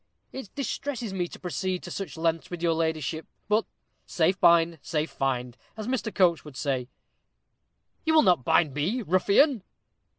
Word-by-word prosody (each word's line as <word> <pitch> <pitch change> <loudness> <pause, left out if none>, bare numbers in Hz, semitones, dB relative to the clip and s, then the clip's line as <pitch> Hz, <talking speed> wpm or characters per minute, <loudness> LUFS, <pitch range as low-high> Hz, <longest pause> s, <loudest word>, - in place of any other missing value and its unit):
It 265 -7 -7
distresses 265 -5 -3
me 180 -2 -1
to - - -12
proceed 185 0 -3
to - - -8
such 180 -7 -5
lengths 165 0 -1
with 175 -1 -6
your 170 -1 +3
ladyship 160 -1 -2 0.2
but 215 +1 +2 0.4
safe 185 +3 +1
bind, 170 -2 +4
safe 155 -1 -2
find, 125 -3 -2 0.2
as 215 0 -5
Mr. 250 -3 -1
Coates 175 -5 +3
would 150 -4 -11
say." 130 -4 -2 1.1
"You 320 -1 +2
will 310 - +7
not 175 -8 +3
bind 145 +3 +3
me, 185 - -1
ruffian." 200 - +3
175 Hz, 160 wpm, -27 LUFS, 160-210 Hz, 1.1 s, will